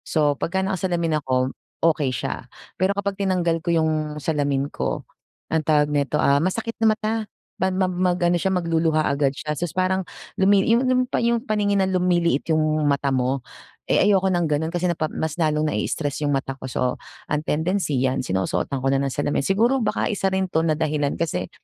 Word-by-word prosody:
So, 150 -3 +1
pagka 190 +6 -2
nakasalamin 175 -5 0
ako, 130 -1 0 0.3
okay 155 -4 +3
siya, 130 - -4 0.3
pero 195 +2 +2
kapag 200 0 -2
tinanggal 175 -4 +1
ko 175 - -7
'yong 155 -2 +1
salamin 145 -2 -1
ko, - - -3 0.5
anong 160 -2 0
tawag 150 -1 +4
nito, 145 0 0
ah, 140 -1 +3
masakit 220 +7 -1
na 225 - +5
mata, 215 0 -2 0.5
man 190 0 +1
mam 185 -1 +1
mag-ano 175 -1 +2
siya 190 - +1
magluluha 165 -3 +1
agad 140 -1 +1
siya, 150 -1 -3
sus 165 +2 -4
parang 185 +1 +1 0.4
lumi 195 +1 +5
'yong 240 +3 +3
'yong 255 0 +3
pa - - 0
'yong 235 0 +1
paningin 205 -3 +1
na 190 - -1
lumiliit 175 -5 +1
'yong 155 -1 +2
mata 140 -1 +1
mo. 130 0 0 0.4
Eh, - - +4
ayoko 195 -2 +3
ng 175 -2 +1
gano'n 155 0 0
kasi 175 +1 -3
napa 160 -3 0
mas 160 -1 -3
lalong 155 -1 +2
nai-stress 145 -2 -2
'yong 145 - +1
mata 135 -1 -1
ko, 130 - -6
so, 125 +1 0 0.3
ang 150 - -1
tendency 160 -1 0
'yan 130 0 +1
sinusuotan 95 +5 -1
ko - - 0
na 135 - +2
ng 140 - -1
salamin. 145 +2 -1
Siguro, 230 - +2
baka 220 - 0
isa 195 -1 0
rin 190 0 0
'to 160 -3 0
na 160 -2 +1
dahilan 150 -2 0
kasi, 95 - -2
160 Hz, 190 wpm, -23 LUFS, 145-190 Hz, 0.5 s, na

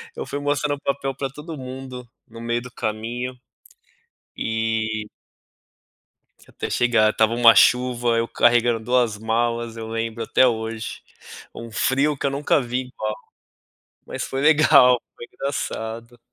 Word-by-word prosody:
Eu - - -5
fui 145 - -4
mostrando 145 0 0
o - - -20
papel 135 -1 -2
pra 135 -1 -3
todo 150 +3 -9
mundo 130 -1 -8 0.2
no 115 +1 -11
meio 120 0 -1
do 125 0 -11
caminho 120 +3 -4 1.0
e 110 -1 -2 1.4
Até - - -6
chegar, 120 -3 +3
estava 110 +1 +2
uma 115 -1 +7
chuva, 120 -1 +3
eu 115 0 0
carregando 120 -1 +3
2 120 -2 +1
malas, 115 +1 -1
eu 115 -1 -6
lembro 115 0 -3
até 130 - +4
hoje, 110 -1 -4 0.5
um 115 0 -8
frio 135 +6 +1
que - - -4
eu 140 - +1
nunca 145 +1 +1
vi 125 +1 -2
igual. 110 -4 -4 0.9
Mas - - -5
foi 135 +1 -3
legal, 145 -5 +6
foi - - -9
engraçado. 115 -3 -5
120 Hz, 140 wpm, -22 LUFS, 115-130 Hz, 1.4 s, uma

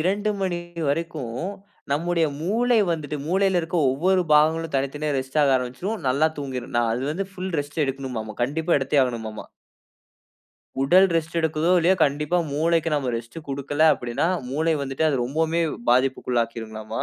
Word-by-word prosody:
2 200 +5 0
மணி 185 -2 -1 0.3
வரைக்கும், 150 -5 -3 0.6
நம்முடைய 165 +2 +1
மூளை 230 +7 +2
வந்துட்டு 150 -2 -4
மூளையில 190 0 +2
இருக்கிற 170 +1 -1
ஒவ்வொரு 185 +7 +2
பாகங்களும் 160 +1 +3
தனித்தனியா 145 +2 -2
ரெஸ்ட் 130 +3 -3
ஆக 140 -2 +4
ஆரம்பிச்சுரும், 130 - -4
நல்லா 140 +5 +3
தூங்கிடும், 130 -4 -5
நான் 120 -1 +2
அது 125 +3 -3
வந்து 195 +4 -3
ஃபுல் 185 -1 -5
ரெஸ்ட் 145 +2 -3
எடுக்கனுமாம, 130 -6 -4
கண்டிப்பா 160 +7 +1
எடுத்தே 140 +1 +2
ஆகனுமாம. 110 -3 -5 1.4
உடல் 185 +8 +6
ரெஸ்ட் 165 +1 -2
எடுக்குதோ 160 +1 0
இல்லையோ, 175 +3 +4
கண்டிப்பா 150 +4 0
மூளைக்கு 165 +2 +1
நம்ம 135 -4 0
ரெஸ்ட் 115 +6 -8
கொடுக்கல 140 +2 -1
அப்படினா, 120 +5 -2 0.2
மூளை 160 +4 +1
வந்துட்டு 140 +3 -1
அது 135 -5 0
ரொம்பவுமே 160 +5 0 0.3
பாதிப்புக்குள்ள 125 -1 +2
ஆக்கிருங்கலாமா. 110 -1 -6
150 Hz, 145 wpm, -24 LUFS, 130-170 Hz, 1.4 s, உடல்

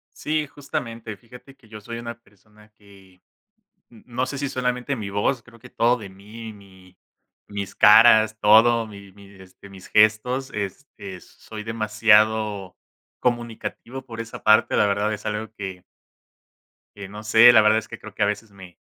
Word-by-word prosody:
Sí, 155 0 -2
justamente 115 -6 -6
fíjate 125 +4 -16
que 120 - -24
yo 110 -1 -10
soy 115 +3 -7
una 120 0 -7
persona 105 0 -24
que 95 -3 -20 0.7
no 115 -3 -19
no 125 +1 -3
sé, 140 - -6
si 140 0 -3
solamente 125 +1 -2
mi 105 -3 -6
voz, 100 +5 -1
creo 115 -1 -18
que - - -14
todo 120 +2 +1
de 105 -5 -10
mí 105 +4 -11
mi 95 -2 -19 0.5
mis 100 -1 -6
caras, 110 0 +6
todo, 115 +2 +5
mi 100 -2 -13
mi 100 0 -16
este 95 +1 -16
mis 95 -1 -13
gestos, 110 +5 +2
este, 100 -2 -7
soy 110 -1 -11
demasiado 110 -2 +1 0.4
comunicativo 120 +1 -4
por 115 -2 -10
esa 115 0 -8
parte, 110 0 +4
la - - +3
verdad 105 +1 0
es 105 - -8
algo 105 +1 -4
que 95 -3 -7 1.1
que 100 -1 -8
no 105 +2 -10
sé, 110 +2 +7
la 110 - +7
verdad 110 +1 +4
es 110 - -12
que - - -10
creo 110 -2 -12
que - - 0
a - - +4
veces 105 +1 -4
me 95 -3 -14
110 Hz, 170 wpm, -23 LUFS, 100-120 Hz, 1.1 s, sé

